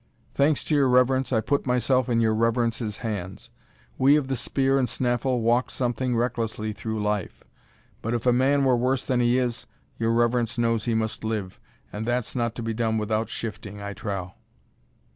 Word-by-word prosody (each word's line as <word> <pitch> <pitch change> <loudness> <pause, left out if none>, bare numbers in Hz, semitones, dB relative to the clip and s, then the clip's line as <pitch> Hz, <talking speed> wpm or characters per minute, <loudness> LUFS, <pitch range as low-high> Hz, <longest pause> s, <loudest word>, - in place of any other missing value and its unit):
"Thanks 145 +1 +2
to - - -2
your 140 -3 +4
reverence, 130 +1 +3
I 110 -3 +2
put 140 +5 -1
myself 125 +1 +2
in 115 -1 +2
your 110 -1 +3
reverence's 115 -1 0
hands. 105 +2 -5 0.5
We 135 +2 +6
of 140 -3 -2
the 135 - 0
spear 135 +2 +1
and 125 -3 0
snaffle 125 +1 0
walk 120 +2 +2
something 125 0 -1
recklessly 115 -3 -2
through 110 +1 -4
life; 105 -2 -2 0.6
but 115 +2 -1
if 120 - -3
a 125 - +5
man 135 +3 +3
were 130 -1 +4
worse 125 +2 0
than 125 -2 +1
he 120 +1 +3
is, 125 -1 -2 0.3
your 115 0 +1
reverence 120 0 +1
knows 115 -2 +1
he 115 - 0
must 110 0 -2
live, 105 -4 -3 0.3
and 105 - -4
that's 120 0 -1
not 120 -2 -1
to 120 - -5
be 115 0 -2
done 110 0 0
without 110 +1 -1
shifting, 105 -2 -6
I 100 0 -5
trow." 95 -3 -5
120 Hz, 185 wpm, -25 LUFS, 110-125 Hz, 0.6 s, We